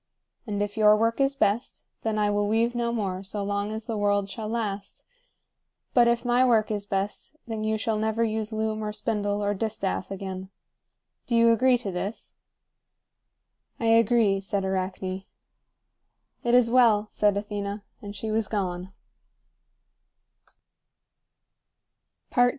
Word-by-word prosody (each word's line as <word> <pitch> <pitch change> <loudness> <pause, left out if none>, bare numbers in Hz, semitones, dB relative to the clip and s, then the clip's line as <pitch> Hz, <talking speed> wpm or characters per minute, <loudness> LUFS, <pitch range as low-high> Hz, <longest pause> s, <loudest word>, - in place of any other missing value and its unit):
And 205 -1 -1
if 205 +1 -5
your 210 -1 +6
work 230 +4 +1
is 275 0 +2
best, 215 -1 0 0.2
then 220 -1 -1
I 210 -1 +2
will 205 0 +1
weave 225 +3 +2
no 235 -1 -1
more 195 -5 -2
so 200 +1 -4
long 200 +1 -2
as 220 0 -5
the 225 -2 -3
world 205 -1 +2
shall 215 +2 -6
last; 210 -3 -4 0.9
but 240 -2 +6
if 235 +1 +1
my 245 +1 +4
work 225 -4 +3
is 205 -1 -3
best, 200 +8 -3
then 220 -2 -4
you 220 0 0
shall 220 -1 -1
never 220 +1 0
use 220 -1 -2
loom 220 0 -2
or 210 - -2
spindle 210 -1 -1
or 205 0 +1
distaff 205 -3 -2
again. 190 -1 -6 0.8
Do 235 - 0
you 230 0 +6
agree 250 +2 +4
to 210 -5 -5
this?" 195 +5 -5 1.5
"I 230 - +1
agree," 225 -3 +4
said 195 0 -2
Arachne. 190 0 -2 1.2
"It 240 0 +2
is 240 -2 +4
well," 230 -4 +5
said 205 -1 +2
Athena. 205 0 -4 0.2
And 205 0 -8
she 215 +2 -4
was 220 -1 0
gone. 185 -3 -3
215 Hz, 145 wpm, -26 LUFS, 200-230 Hz, 1.5 s, your